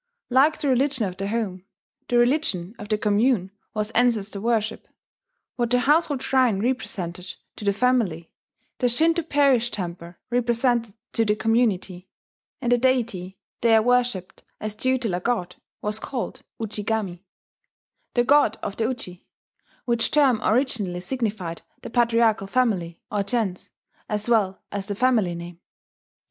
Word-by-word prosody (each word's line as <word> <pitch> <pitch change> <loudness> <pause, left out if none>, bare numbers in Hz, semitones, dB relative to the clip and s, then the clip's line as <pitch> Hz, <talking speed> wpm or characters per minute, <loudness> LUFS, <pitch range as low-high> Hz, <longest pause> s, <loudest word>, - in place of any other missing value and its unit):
Like 280 +5 +4
the 290 - -1
religion 260 -2 +2
of 185 -1 -5
the 195 0 -3
home, 205 -4 -2 0.4
the 245 - +2
religion 240 - +1
of 210 - -8
the 215 - +2
commune 210 -1 +2 0.2
was 215 0 -2
ancestor 220 -5 +1
worship. 225 -1 -1 0.7
What 240 -2 0
the 250 0 +3
household 295 -1 +2
shrine 255 -7 +2
represented 185 -7 -3 0.2
to 210 - -7
the 200 - +4
family, 205 -7 0 0.5
the 250 - +2
Shinto 325 +7 +3
parish 280 -6 +3
temple 175 -4 -6 0.2
represented 240 -2 +1 0.2
to 225 - +3
the 210 -1 +2
community; 210 -5 0 0.5
and 240 - +1
the 245 - +4
deity 230 -8 0 0.2
there 225 -2 +5
worshipped 245 -6 0 0.2
as 215 0 -4
tutelar 240 -6 0
god 180 -6 -2 0.3
was 210 +1 0
called 245 +1 -5 0.2
Ujigami, 210 -4 -3 0.9
the 240 - +4
god 265 -4 +4
of 200 - -4
the 225 - +1
Uji, 185 -8 -5 0.6
which 235 -2 +1
term 270 -7 +3
originally 215 -7 0
signified 205 -6 -3 0.2
the - - -7
patriarchal 230 -4 +2
family 195 -8 0
or 205 - 0
gens, 200 -3 -2 0.4
as 210 +1 -2
well 210 -5 +1
as 200 -1 -4
the 205 - -3
family 220 -7 +2
name. 170 0 -8
225 Hz, 140 wpm, -24 LUFS, 195-245 Hz, 0.9 s, there